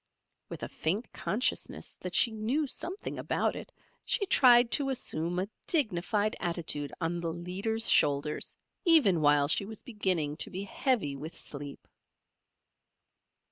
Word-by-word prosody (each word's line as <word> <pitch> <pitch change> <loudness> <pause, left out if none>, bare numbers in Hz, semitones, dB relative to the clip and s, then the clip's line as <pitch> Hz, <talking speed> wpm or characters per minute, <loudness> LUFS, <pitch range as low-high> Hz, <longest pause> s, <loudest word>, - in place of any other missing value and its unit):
With - - -8
a - - -3
faint 195 +10 -3
consciousness 235 +5 -2
that 180 0 -5
she 235 - +5
knew 225 +8 -1
something 355 +8 -4
about - - -1
it, - - -9 0.3
she 405 - 0
tried 245 -8 +5
to 270 +5 +3
assume 175 -9 -1
a 185 +2 -1 0.2
dignified 215 - +1
attitude 170 -5 -1
on 170 0 -2
the 165 -1 -3
leader's 190 +7 -1
shoulders 145 +1 +2 0.3
even 280 - +5
while 145 -1 +4
she 165 - +2
was 215 +1 -10
beginning 185 - 0
to - - 0
be 190 +2 -5
heavy 200 - -1
with 155 +4 -8
sleep. 145 -1 -7
190 Hz, 140 wpm, -30 LUFS, 160-235 Hz, 0.3 s, she